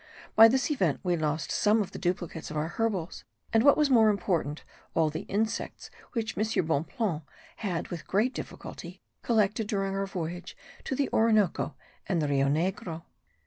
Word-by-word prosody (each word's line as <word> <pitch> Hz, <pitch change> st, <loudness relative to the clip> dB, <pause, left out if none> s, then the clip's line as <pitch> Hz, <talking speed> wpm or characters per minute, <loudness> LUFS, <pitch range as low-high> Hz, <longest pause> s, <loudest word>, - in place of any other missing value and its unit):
By 225 Hz, +1 st, +10 dB
this 265 Hz, +5 st, +1 dB
event 185 Hz, -, +1 dB
we 180 Hz, -2 st, +1 dB
lost 155 Hz, -2 st, -1 dB
some 215 Hz, +2 st, +3 dB
of 205 Hz, -, -2 dB
the -, -, -7 dB
duplicates 175 Hz, -3 st, -3 dB
of 155 Hz, -, -4 dB
our 155 Hz, +2 st, -1 dB
herbals, 195 Hz, -5 st, -2 dB, 0.3 s
and 225 Hz, -, +5 dB
what 285 Hz, +3 st, +6 dB
was 300 Hz, -2 st, +3 dB
more 225 Hz, -3 st, +6 dB
important, 175 Hz, -7 st, -1 dB, 0.3 s
all 160 Hz, -2 st, +3 dB
the 155 Hz, -, -6 dB
insects 220 Hz, +2 st, -2 dB, 0.2 s
which 225 Hz, -3 st, -2 dB
M. 215 Hz, -4 st, 0 dB
Bonpland 160 Hz, +3 st, -1 dB, 0.4 s
had 180 Hz, -5 st, -3 dB
with 175 Hz, -, -6 dB
great 220 Hz, +7 st, +2 dB
difficulty -, -, -8 dB, 0.2 s
collected 215 Hz, -2 st, +1 dB
during 195 Hz, -2 st, -1 dB
our 195 Hz, 0 st, -1 dB
voyage 175 Hz, -1 st, -5 dB, 0.3 s
to 265 Hz, -, -2 dB
the 280 Hz, +1 st, +1 dB
Orinoco 215 Hz, -5 st, +2 dB, 0.3 s
and 180 Hz, -4 st, +2 dB
the 150 Hz, -, 0 dB
Rio 140 Hz, -1 st, +2 dB
Negro. 165 Hz, +2 st, -1 dB
195 Hz, 170 wpm, -28 LUFS, 165-220 Hz, 0.4 s, By